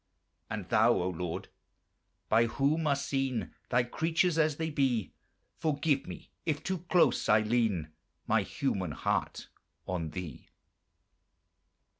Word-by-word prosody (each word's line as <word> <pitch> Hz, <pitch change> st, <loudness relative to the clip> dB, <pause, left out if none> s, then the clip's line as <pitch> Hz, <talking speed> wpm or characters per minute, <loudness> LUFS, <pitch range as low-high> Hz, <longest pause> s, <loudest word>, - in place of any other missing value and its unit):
And 105 Hz, -4 st, -4 dB
Thou, 115 Hz, +2 st, +5 dB
O 90 Hz, -3 st, 0 dB
Lord! 90 Hz, -1 st, -4 dB, 0.8 s
by 115 Hz, +2 st, +4 dB
whom 150 Hz, +6 st, +1 dB
are 140 Hz, -, +3 dB
seen 135 Hz, -3 st, -2 dB, 0.2 s
Thy 125 Hz, 0 st, +3 dB
creatures 165 Hz, +6 st, +1 dB
as 155 Hz, -2 st, +2 dB
they 160 Hz, 0 st, -2 dB
be, 130 Hz, -8 st, 0 dB, 0.5 s
Forgive 150 Hz, -1 st, +1 dB
me -, -, -9 dB
if 155 Hz, -1 st, -1 dB
too 190 Hz, -2 st, -2 dB
close 180 Hz, -, +3 dB
I 105 Hz, +1 st, +6 dB
lean 110 Hz, -8 st, +1 dB, 0.4 s
My 110 Hz, 0 st, +3 dB
human 95 Hz, -, -2 dB
heart 70 Hz, -5 st, -2 dB, 0.4 s
on 85 Hz, -4 st, -2 dB
Thee! 85 Hz, -6 st, -7 dB
120 Hz, 125 wpm, -31 LUFS, 100-150 Hz, 0.8 s, I